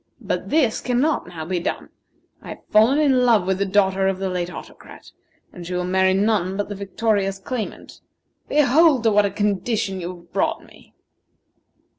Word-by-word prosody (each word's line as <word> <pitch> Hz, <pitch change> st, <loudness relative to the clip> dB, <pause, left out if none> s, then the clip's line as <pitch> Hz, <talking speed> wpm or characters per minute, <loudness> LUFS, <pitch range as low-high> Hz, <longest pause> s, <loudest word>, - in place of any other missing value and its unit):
But -, -, -4 dB
this 280 Hz, -8 st, +1 dB
cannot 255 Hz, +5 st, 0 dB
now 165 Hz, -3 st, -7 dB
be 180 Hz, +1 st, -2 dB
done. 170 Hz, -, -4 dB, 0.5 s
I -, -, -11 dB
have -, -, -10 dB
fallen 220 Hz, +6 st, +5 dB
in 270 Hz, -4 st, +3 dB
love 225 Hz, -6 st, +3 dB
with 190 Hz, 0 st, -1 dB
the 200 Hz, -, 0 dB
daughter 190 Hz, -1 st, +2 dB
of 195 Hz, -1 st, 0 dB
the 190 Hz, 0 st, -3 dB
late 180 Hz, -1 st, -3 dB
Autocrat, -, -, -12 dB, 0.4 s
and 180 Hz, -, -9 dB
she 180 Hz, +1 st, -5 dB
will 180 Hz, -, -1 dB
marry 190 Hz, +1 st, +2 dB
none 195 Hz, -2 st, 0 dB
but 205 Hz, -, -3 dB
the -, -, -4 dB
victorious 200 Hz, 0 st, -1 dB
claimant. 220 Hz, +3 st, -7 dB, 0.5 s
Behold 295 Hz, -1 st, +4 dB
to 225 Hz, -, +3 dB
what 205 Hz, 0 st, +4 dB
a -, -, -3 dB
condition 205 Hz, -1 st, -2 dB
you 175 Hz, +1 st, -5 dB
have 170 Hz, 0 st, -20 dB
brought 195 Hz, -, -1 dB
me!" -, -, -20 dB
200 Hz, 180 wpm, -21 LUFS, 185-230 Hz, 0.5 s, fallen